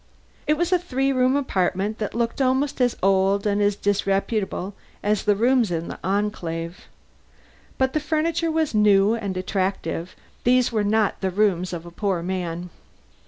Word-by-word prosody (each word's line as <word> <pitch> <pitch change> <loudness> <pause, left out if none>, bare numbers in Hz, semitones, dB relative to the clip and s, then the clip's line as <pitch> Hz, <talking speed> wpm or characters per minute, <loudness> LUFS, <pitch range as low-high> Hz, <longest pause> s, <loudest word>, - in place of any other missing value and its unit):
It 300 - +4
was 345 +2 0
a 365 - +4
three 270 -5 0
room 255 +1 +3
apartment 200 -5 0
that 210 0 -3
looked 235 +3 -1
almost 265 +1 +1
as 245 -1 +2
old 195 +1 +3
and 205 0 +1
as 205 0 +2
disreputable 200 0 -1 0.3
as 210 0 +1
the 205 -1 +3
rooms 240 +1 +3
in 170 -1 -3
the - - -7
Enclave. 180 -4 -3 0.9
But 265 0 +1
the 310 - +1
furniture 320 +2 0
was 315 -3 0
new 210 0 +4
and 200 -5 -3
attractive; 185 -2 -2 0.3
these 250 0 +3
were 215 -2 +1
not 210 0 +1
the 190 - 0
rooms 185 -2 +1
of 170 -1 -6
a 170 - -10
poor 185 -2 -1
man. 175 -1 -4
205 Hz, 165 wpm, -23 LUFS, 190-255 Hz, 0.9 s, It